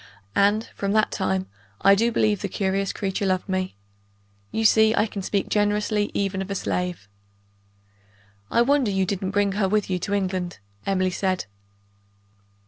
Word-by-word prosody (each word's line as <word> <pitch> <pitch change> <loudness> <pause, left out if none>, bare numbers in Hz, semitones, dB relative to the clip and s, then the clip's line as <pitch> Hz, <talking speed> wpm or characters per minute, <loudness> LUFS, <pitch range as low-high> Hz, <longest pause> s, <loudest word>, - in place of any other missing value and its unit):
and, 205 +3 +3
from 200 0 -2
that 215 0 +3
time, 95 -1 -1 0.4
I 195 - +7
do 230 +4 +2
believe 215 -3 +1
the - - -1
curious 195 0 -1
creature 195 0 -3
loved 185 -1 0
me. 185 - -2 0.7
You 225 - -1
see 220 +1 +5
I - - +3
can 205 -2 -5
speak 195 +1 -1
generously 210 0 +1
even 195 -1 -1
of 190 - -5
a 200 - -2
slave!" 180 - -2 1.4
"I 235 - +4
wonder 275 -2 +2
you 190 -1 +1
didn't 190 0 -2
bring 205 0 +1
her 195 -1 0
with 210 -1 0
you 180 - 0
to 200 - -3
England," 185 -2 -2 0.3
Emily 185 -1 +1
said. 185 0 -1
195 Hz, 160 wpm, -24 LUFS, 185-210 Hz, 1.4 s, I